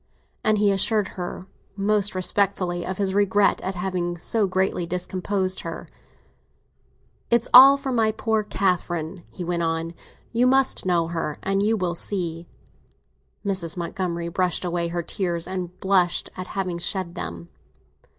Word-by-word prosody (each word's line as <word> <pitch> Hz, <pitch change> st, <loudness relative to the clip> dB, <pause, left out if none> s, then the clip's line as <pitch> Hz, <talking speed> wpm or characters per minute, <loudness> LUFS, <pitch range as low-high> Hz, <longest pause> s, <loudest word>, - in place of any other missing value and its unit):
And 215 Hz, 0 st, +3 dB
he 205 Hz, -1 st, +3 dB
assured 205 Hz, +1 st, +1 dB
her 180 Hz, 0 st, -6 dB, 0.3 s
most 205 Hz, 0 st, +1 dB
respectfully 185 Hz, -2 st, 0 dB
of 185 Hz, 0 st, -4 dB
his 195 Hz, -2 st, 0 dB
regret 205 Hz, 0 st, +3 dB
at 190 Hz, 0 st, -3 dB
having 175 Hz, -1 st, -2 dB
so 210 Hz, +4 st, +2 dB
greatly 185 Hz, -2 st, 0 dB
discomposed 185 Hz, +2 st, -2 dB
her. -, -, -6 dB, 1.4 s
"It's 235 Hz, -1 st, +2 dB
all 270 Hz, +3 st, +10 dB
for 275 Hz, -1 st, -4 dB
my 225 Hz, -3 st, +2 dB
poor 220 Hz, 0 st, 0 dB
Catherine," 180 Hz, -4 st, -1 dB
he 180 Hz, -, -7 dB
went 170 Hz, 0 st, -1 dB
on. 165 Hz, 0 st, -2 dB, 0.4 s
"You 240 Hz, +2 st, +3 dB
must 265 Hz, -6 st, +3 dB
know 170 Hz, -2 st, +1 dB
her, 165 Hz, -3 st, -3 dB
and 195 Hz, +1 st, +1 dB
you 220 Hz, +2 st, +2 dB
will 180 Hz, -3 st, -1 dB
see." 170 Hz, -2 st, -3 dB, 1.0 s
Mrs. 185 Hz, -4 st, -1 dB
Montgomery 170 Hz, 0 st, -3 dB
brushed 180 Hz, +1 st, -1 dB
away 175 Hz, -1 st, -1 dB
her 170 Hz, 0 st, -3 dB
tears, 170 Hz, -3 st, -2 dB
and 185 Hz, -1 st, -5 dB
blushed 185 Hz, -3 st, +1 dB
at 185 Hz, 0 st, -6 dB
having 180 Hz, -3 st, -2 dB
shed 175 Hz, 0 st, -1 dB
them. 85 Hz, -, -7 dB
185 Hz, 145 wpm, -24 LUFS, 175-200 Hz, 1.4 s, all